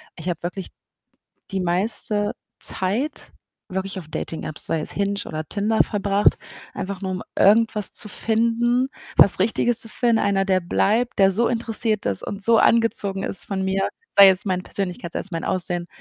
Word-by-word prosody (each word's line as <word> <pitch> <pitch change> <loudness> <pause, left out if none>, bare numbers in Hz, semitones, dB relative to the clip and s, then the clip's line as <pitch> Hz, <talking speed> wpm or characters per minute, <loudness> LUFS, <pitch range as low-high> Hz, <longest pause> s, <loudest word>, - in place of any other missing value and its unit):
ich 170 +1 -5
habe 170 -2 -3
wirklich 180 +2 -5 0.8
die 195 - -1
meiste 205 +3 0 0.3
Zeit 220 +11 -2 0.4
wirklich 190 +1 -4
auf 165 - -11
Dating-Apps, 155 -1 -5
sei 160 - -1
es - - -5
„Hinge“ 200 0 -1
oder 155 0 -5
„Tinder“ 215 +4 +1
verbracht, 205 0 +1 0.4
einfach 195 0 -5
nur 190 -1 -3
um 185 - -4
irgendwas 215 0 +4
zu - - -2
finden, 235 +4 +1 0.3
was 200 - +6
Richtiges 230 +4 +2
zu 225 - +3
finden. 235 -1 +1
Einer, 200 -1 +1
der 190 -1 +2
bleibt, 220 +7 0
der 195 0 +5
so 230 +5 +1
interessiert 225 -2 0
ist 100 -2 -1
und 200 0 -5
so 230 +1 +4
angezogen 205 -4 +2
ist 190 - -3
von 190 -1 -3
mir, 190 0 0 0.2
sei 200 -1 +8
es 190 +1 +1
meine 185 -2 -1
Persönlichkeit, 180 -3 -4
sei - - -2
es 200 - -6
mein 165 -1 -4
Aussehen. 175 -1 -1
200 Hz, 170 wpm, -22 LUFS, 185-225 Hz, 0.8 s, sei